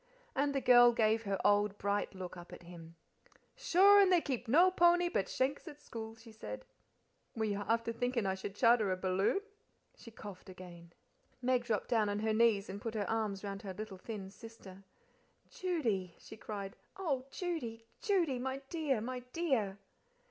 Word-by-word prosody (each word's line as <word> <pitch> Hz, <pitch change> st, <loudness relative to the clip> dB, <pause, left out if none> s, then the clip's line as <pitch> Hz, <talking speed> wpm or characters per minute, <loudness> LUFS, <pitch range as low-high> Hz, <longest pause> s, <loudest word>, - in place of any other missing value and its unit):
And 280 Hz, +1 st, +1 dB
the 275 Hz, -, +1 dB
girl 245 Hz, -1 st, +7 dB
gave 225 Hz, 0 st, +2 dB
her 195 Hz, -1 st, -1 dB
old 205 Hz, 0 st, +3 dB
bright 200 Hz, 0 st, -1 dB
look 185 Hz, -1 st, -7 dB
up 175 Hz, -1 st, -11 dB
at -, -, -11 dB
him. 170 Hz, -1 st, -12 dB, 0.6 s
"Sure 405 Hz, -4 st, +6 dB
and 385 Hz, -2 st, +4 dB
they 360 Hz, -, +6 dB
keep 260 Hz, -6 st, -4 dB
no 345 Hz, +10 st, +5 dB
pony 350 Hz, -1 st, +4 dB
but 195 Hz, -, -1 dB
shank's 275 Hz, +5 st, -1 dB
at 295 Hz, -2 st, -9 dB
school," 225 Hz, -5 st, -8 dB
she 225 Hz, 0 st, -15 dB
said; 105 Hz, -, -8 dB, 0.7 s
"were 220 Hz, -1 st, -1 dB
you 205 Hz, -1 st, -2 dB
afther 230 Hz, 0 st, 0 dB
thinkin' 245 Hz, -1 st, -1 dB
I 190 Hz, -, +1 dB
should 190 Hz, +1 st, -6 dB
charter 230 Hz, -3 st, +4 dB
a 185 Hz, -, -1 dB
balloon?" 190 Hz, -, +1 dB, 0.5 s
She 230 Hz, -, -13 dB
coughed 205 Hz, -4 st, -11 dB
again. 175 Hz, -2 st, -12 dB, 0.5 s
Meg 250 Hz, -1 st, +1 dB
dropped 220 Hz, -4 st, -1 dB
down 220 Hz, -4 st, +2 dB
on 205 Hz, -, -1 dB
her 220 Hz, +1 st, 0 dB
knees 220 Hz, -3 st, +3 dB
and 200 Hz, +2 st, -7 dB
put 225 Hz, -1 st, -5 dB
her 205 Hz, -2 st, -1 dB
arms 215 Hz, -3 st, -2 dB
round 200 Hz, -1 st, -5 dB
her 190 Hz, -2 st, -7 dB
little 210 Hz, -2 st, -7 dB
thin 195 Hz, -2 st, -7 dB
sister. 200 Hz, -4 st, -13 dB, 0.7 s
"Judy," 225 Hz, -, -2 dB
she -, -, -12 dB
cried, 200 Hz, -3 st, -6 dB, 0.2 s
"oh, 280 Hz, -9 st, -2 dB
Judy, 270 Hz, -9 st, -4 dB, 0.2 s
Judy! 345 Hz, -, +1 dB
my 265 Hz, +2 st, -3 dB
dear, 295 Hz, -9 st, 0 dB
my 250 Hz, +2 st, -4 dB
dear!" 255 Hz, -, 0 dB
225 Hz, 175 wpm, -34 LUFS, 195-260 Hz, 0.7 s, girl